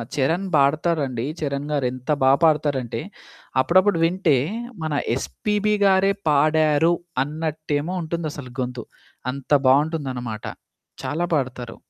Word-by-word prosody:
చరణ్ 165 +8 0
పాడతారండి. 140 -3 +1 0.2
చరణ్ 140 0 -2
గారు 140 -3 0
ఎంత 130 +2 -10
బా 130 - +6
పాడతారంటే, 145 -6 +1 0.6
అప్పుడప్పుడు 185 +5 +3
వింటే 170 -5 +2 0.5
మన 155 -1 -2 0.2
'ఎస్‌పీబీ' 210 +8 -1
గారే 195 0 +4 0.2
పాడారు, 155 +2 +3 0.3
అన్నట్టేమో 155 +1 -3
ఉంటుందసలు 155 -5 -5
గొంతు. 125 -1 -4 0.5
అంత 140 +1 -10 0.2
బావుంటుందనమాట. 130 -6 0 0.6
చాలా 150 +7 -1
పాడతారు. 125 -3 -3
150 Hz, 100 wpm, -23 LUFS, 130-165 Hz, 0.6 s, బా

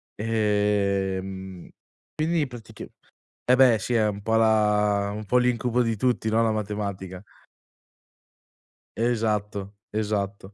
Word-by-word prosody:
Ehm, 100 -4 -1 0.5
quindi 160 0 +1
pratica 110 -3 -10 0.7
e 125 - +7
beh, 125 -4 +6
sì, 120 +5 -3
è 110 -2 +3
un 100 0 -4
po' 110 +2 -1
la 105 -2 +2
un 105 0 -6
po' 125 +5 +2
l'incubo 125 0 +1
di 115 -2 -1
tutti, 120 -1 0
no, 115 +1 +2
la 115 - +2
matematica 100 -3 -4 1.8
Esatto, 105 -4 -1 0.2
esatto. 105 -2 -3
105 Hz, 115 wpm, -25 LUFS, 100-115 Hz, 1.8 s, e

